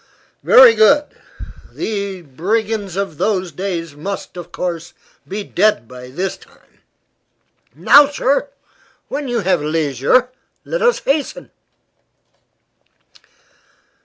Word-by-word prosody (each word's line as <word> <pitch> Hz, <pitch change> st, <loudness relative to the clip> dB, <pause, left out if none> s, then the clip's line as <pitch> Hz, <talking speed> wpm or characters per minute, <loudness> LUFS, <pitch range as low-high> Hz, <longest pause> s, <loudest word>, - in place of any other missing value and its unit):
"Very 250 Hz, -2 st, +8 dB
good. 255 Hz, +7 st, +3 dB, 0.6 s
The 200 Hz, -4 st, -4 dB
brigands 200 Hz, -, -2 dB
of 195 Hz, -6 st, -4 dB
those 190 Hz, -4 st, -1 dB
days 165 Hz, -2 st, -5 dB
must, 195 Hz, +7 st, -6 dB
of 175 Hz, -1 st, -9 dB
course, 170 Hz, -2 st, -5 dB, 0.3 s
be 205 Hz, +2 st, -5 dB
dead 200 Hz, -, +1 dB
by 125 Hz, 0 st, -11 dB
this 180 Hz, +9 st, -4 dB
time. -, -, -24 dB, 0.9 s
Now, 285 Hz, 0 st, +6 dB
sir, 285 Hz, 0 st, 0 dB, 0.6 s
when 285 Hz, 0 st, -4 dB
you 240 Hz, -2 st, -1 dB
have 180 Hz, -4 st, +1 dB
leisure, 155 Hz, -, +1 dB, 0.4 s
let -, -, -3 dB
us 480 Hz, 0 st, +2 dB
hasten." 285 Hz, +1 st, -2 dB
195 Hz, 105 wpm, -18 LUFS, 165-230 Hz, 0.9 s, Very